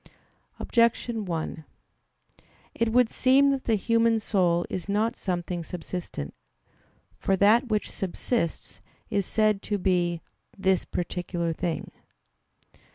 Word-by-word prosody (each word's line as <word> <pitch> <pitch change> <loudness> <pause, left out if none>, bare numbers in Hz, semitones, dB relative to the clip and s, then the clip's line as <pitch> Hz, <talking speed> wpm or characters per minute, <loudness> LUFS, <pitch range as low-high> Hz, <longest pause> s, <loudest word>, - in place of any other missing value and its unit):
Objection 230 -2 +1
1: 160 -2 -4 1.1
It 230 -1 0
would 245 0 +5
seem 270 +4 +4
that 270 -1 -2
the 225 - +3
human 230 +1 +2
soul 180 -5 +1
is 185 +1 -5
not 220 +4 +1
something 175 -2 -3
subsistent. 170 - -6 0.9
For 195 - +2
that 215 +7 +4
which 215 -2 -1
subsists 190 0 -2 0.3
is 200 -2 0
said 215 -2 +2
to 205 - -2
be 175 -3 +1 0.4
"this 190 -2 +2
particular 175 -1 -2
thing." 170 0 -3
195 Hz, 110 wpm, -27 LUFS, 175-230 Hz, 1.1 s, would